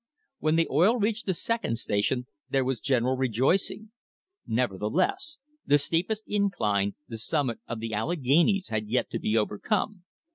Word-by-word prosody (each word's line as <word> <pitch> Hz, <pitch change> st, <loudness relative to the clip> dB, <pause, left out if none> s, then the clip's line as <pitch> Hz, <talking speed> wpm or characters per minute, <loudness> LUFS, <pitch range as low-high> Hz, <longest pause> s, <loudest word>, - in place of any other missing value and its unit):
When 155 Hz, 0 st, +2 dB
the 165 Hz, 0 st, +3 dB
oil 185 Hz, -, +4 dB
reached 225 Hz, +1 st, -1 dB
the 190 Hz, -, +1 dB
second 230 Hz, -, -1 dB
station 120 Hz, +3 st, 0 dB, 0.2 s
there 135 Hz, -1 st, +1 dB
was 130 Hz, -2 st, -1 dB
general 130 Hz, 0 st, +1 dB
rejoicing; 135 Hz, -, +1 dB, 0.6 s
nevertheless, 125 Hz, -, 0 dB, 0.3 s
the 145 Hz, -, +4 dB
steepest 175 Hz, +9 st, -1 dB
incline, 105 Hz, -, 0 dB
the 115 Hz, -3 st, -6 dB
summit 130 Hz, -1 st, -1 dB
of 115 Hz, -1 st, -4 dB
the 115 Hz, 0 st, -4 dB
Alleghanies, 165 Hz, -, +2 dB
had 110 Hz, -1 st, -2 dB
yet 125 Hz, +4 st, 0 dB
to -, -, -2 dB
be 110 Hz, +1 st, +1 dB
overcome. 180 Hz, -, -1 dB
135 Hz, 145 wpm, -27 LUFS, 115-190 Hz, 0.6 s, oil